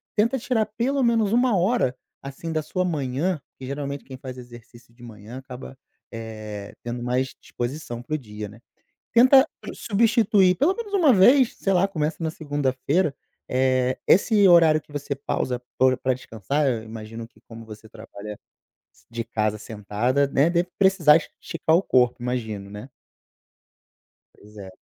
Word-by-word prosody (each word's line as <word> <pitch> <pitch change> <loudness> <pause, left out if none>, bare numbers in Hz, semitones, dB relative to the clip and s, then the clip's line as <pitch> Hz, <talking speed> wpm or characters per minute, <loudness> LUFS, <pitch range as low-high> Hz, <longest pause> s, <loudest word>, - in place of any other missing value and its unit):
Tenta 230 +5 +2
tirar 225 -2 0
pelo 250 +6 -1
menos 225 -3 +2
1 245 -3 +3
hora 185 - +1 0.3
assim 140 +4 -7
da 155 - 0
sua 185 +4 -2
manhã, 150 +1 -1 0.2
que 130 - -9
geralmente 140 +1 -5
quem 130 - -9
faz 130 -1 -8
exercício 120 -1 -14
de 120 - -17
manhã 115 +2 -10
acaba, 130 0 -10 0.3
eh, 110 -3 -7
tendo 120 0 -5
mais 125 +2 -1
disposição 120 -1 -5
para 120 +5 -7
o - - 0
dia, 105 -5 -8
né, 105 +2 -14 0.5
tenta 260 +3 +6 0.2
substituir 215 -4 +3
pelo 335 +8 +2
menos 450 -4 -7
1 330 -9 +5
vez, 245 +6 +5
sei 195 - 0
lá, 185 +1 +3
começa 155 -4 -2
na 160 - -1
segunda-feira, 145 +1 -1 0.3
eh, 130 0 +1
esse 205 +1 +4
horário 165 -3 +6
que 150 - -20
você 145 0 -3
pausa 125 -2 -3 0.2
para 130 0 +4
o - - -6
pra 130 - 0
descansar, 130 +3 -2
eu 120 -4 0
imagino 110 +1 -8
que 120 - -26
como 115 0 -10
você 110 0 -12
trabalha 105 -2 -10 0.6
s - - -27
de 115 0 -3
casa 110 -2 -1
sentada, 110 +6 -1
né, 140 +4 +2
deve 175 +1 0
precisar 190 -6 +6
es 155 - -6
esticar 160 -1 0
o 175 - +4
corpo, 125 -6 +3
imagino, 110 -5 -4
né. 105 +6 -9 1.4
Pois 105 +1 -18
é. 95 -2 -9
135 Hz, 165 wpm, -24 LUFS, 115-185 Hz, 1.4 s, tenta